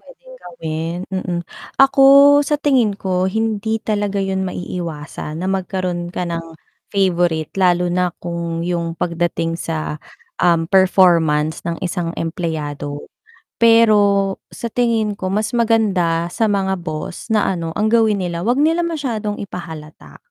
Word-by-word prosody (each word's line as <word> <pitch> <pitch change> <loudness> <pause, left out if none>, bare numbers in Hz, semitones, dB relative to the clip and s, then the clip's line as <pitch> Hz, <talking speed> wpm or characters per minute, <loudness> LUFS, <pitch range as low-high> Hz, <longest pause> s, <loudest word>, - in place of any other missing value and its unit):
Pwedeng - - -16
gawin. 165 -4 -5
Mm. 185 -2 -3 0.4
Ako 275 +1 +7
sa 295 +1 +1
tingin 260 -7 +3
ko, 185 -2 -1
hindi 220 +1 -1
talaga 205 -2 -1
'yun 190 0 -1
maiiwasan 165 -4 -5
na 185 - -2
magkaroon 185 -2 -2
ka 180 -1 -3
ng 165 -1 -3 0.5
favourite 175 -5 +1
lalo 180 -1 +3
na 180 0 0
kung 170 -1 -3
'yung 170 -1 -2
pagdating 170 -1 -1
sa, 155 -2 -3 0.4
um, 165 -2 +2
performance 170 -5 +3
ng 170 -1 -3
isang 175 -2 -2
empleyado 150 -4 -4 0.5
pero 210 -4 +4 0.2
sa 235 - -5
tingin 225 -4 0
ko 185 - -4
mas 215 +1 0
maganda 200 -8 +1
sa 225 +5 0
mga 195 -2 0
boss 155 -1 -6
na 220 -2 +2
ano 165 -3 -2
ang 215 +1 +1
gawin 220 -4 +3
nila 175 +1 -3
'wag 245 - +3
nila 330 +2 +2
masyadong 235 -10 -3
ipahalata. 160 -5 -9
185 Hz, 135 wpm, -19 LUFS, 170-215 Hz, 0.5 s, Ako